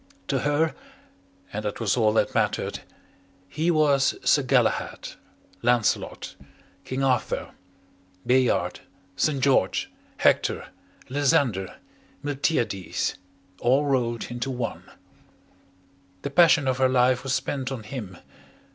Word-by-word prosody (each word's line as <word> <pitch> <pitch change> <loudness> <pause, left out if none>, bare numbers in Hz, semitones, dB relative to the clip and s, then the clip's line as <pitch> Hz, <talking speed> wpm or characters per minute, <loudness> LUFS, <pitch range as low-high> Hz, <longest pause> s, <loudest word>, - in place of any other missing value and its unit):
To 135 - +1
her 145 +3 +1 0.8
and 105 - -3
that 105 - -4
was 115 -4 +1
all 110 -3 +3
that - - +1
mattered - - 0 0.7
he 155 - -1
was 145 -4 +3
Sir - - +5
Galahad, - - 0 0.5
Lancelot, 120 -2 0 0.5
King 130 +1 -3
Arthur, 130 -4 0 0.7
Bayard, 125 -1 +2 0.4
St. 145 +4 +1
George, 130 -8 +2 0.3
Hector, - - +2 0.4
Lysander, 130 -8 +1 0.5
Miltiades, 135 - -1 0.5
all 130 +4 +3
rolled 120 -4 -1
into 120 +2 -3
one. 125 -3 -4 1.4
The 140 - -3
passion 165 -3 +5
of 130 0 0
her 130 -1 +4
life 125 0 +3
was 135 -1 0
spent 135 -2 -3
on 125 -5 -5
him. 105 -6 -7
130 Hz, 110 wpm, -25 LUFS, 120-140 Hz, 1.4 s, Sir